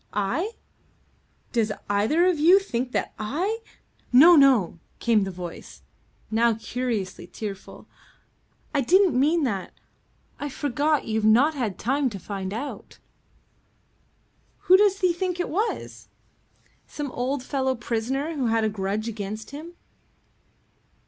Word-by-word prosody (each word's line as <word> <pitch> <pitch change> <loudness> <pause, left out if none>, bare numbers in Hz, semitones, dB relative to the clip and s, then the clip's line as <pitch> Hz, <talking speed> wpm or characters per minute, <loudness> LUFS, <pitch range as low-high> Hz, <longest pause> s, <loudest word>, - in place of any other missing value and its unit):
"I? 210 - -1 1.0
Does 225 -3 +1 0.2
either 215 - +2
of 360 -4 +2
you 345 +6 +7
think 255 -10 -2
that - - -2
I 345 - -2 0.3
?" - - -38
"No, 315 +8 +8
no," 255 - +4 0.2
came 220 -4 +2
the - - -4
voice, 180 -2 -9 0.5
now 230 +1 +3
curiously 225 -6 -4
tearful. 200 0 -8 0.9
"I 280 - +2
didn't 370 +7 +4
mean 300 +6 +2
that. 200 -8 -3 0.7
I 290 - -4
forgot 290 +2 0
you've 220 -1 -1
not 245 +9 +5
had 230 - -3
time 270 +3 0
to 205 - -7
find 190 0 -5
out." 240 +8 -6 1.6
"Who 370 - +6
does 400 0 +3
he 365 -2 +3
think 360 0 -3
it 355 - -1
was?" 425 +7 -3 0.8
"Some 290 -3 -5
old 255 +2 -2
fellow 265 -1 -1
prisoner 250 +6 -2
who 265 -4 -1
had 225 0 +1
a 220 - +2
grudge 205 +2 -3
against 215 0 -6
him." 315 +5 -9
255 Hz, 130 wpm, -25 LUFS, 215-310 Hz, 1.6 s, No